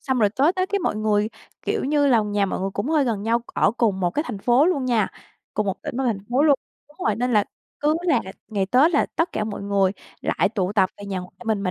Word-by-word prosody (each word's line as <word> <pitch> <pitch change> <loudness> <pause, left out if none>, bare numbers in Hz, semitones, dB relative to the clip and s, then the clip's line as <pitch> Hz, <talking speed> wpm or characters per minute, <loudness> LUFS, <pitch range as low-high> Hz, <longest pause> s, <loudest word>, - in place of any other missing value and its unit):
xong 260 -2 -1
rồi 210 -3 +4
tới 280 - +3
Tết 370 0 -1
cái 400 0 0
mọi 275 - -1
người 215 0 +1 0.3
kiểu - - -1
như 290 +1 +2
là, 240 -5 +4
nhà 205 -1 0
mọi 185 - -3
người 195 - -1
cũng 205 +7 -3
hơi 310 -3 +3
gần 225 -5 -1
nhau, 230 +2 +1
ở - - +3
cùng 220 -5 +1
một 175 -2 +1
cái 300 - -1
thành 225 -5 -5
phố 245 - +4
luôn 285 -8 +1
nha, 230 -5 +2 0.5
cùng 210 0 0
một 195 - -3
tỉnh - - -5
và 265 - 0
thành 230 -5 0
phố 260 +4 +3
luôn 300 -2 +6 0.3
đúng 295 - -22
rồi, 215 - +2
nên 245 +1 0
là 210 -2 +4 0.4
cứ 300 +1 +2
là 345 -4 +3 0.3
ngày 200 -3 -1
Tết 260 - +4
là 300 - +2
tất 330 - +1
cả 215 - -1
mọi 210 -2 -5
người 200 -1 +2 0.3
lại - - +1
tụ 195 -3 -1
tập 190 -3 +3
về 205 - -8
nhà 195 -2 -3
ngoại 180 0 -9
mình, 220 -3 0
mà 185 -2 -1
225 Hz, 270 wpm, -23 LUFS, 200-275 Hz, 0.5 s, luôn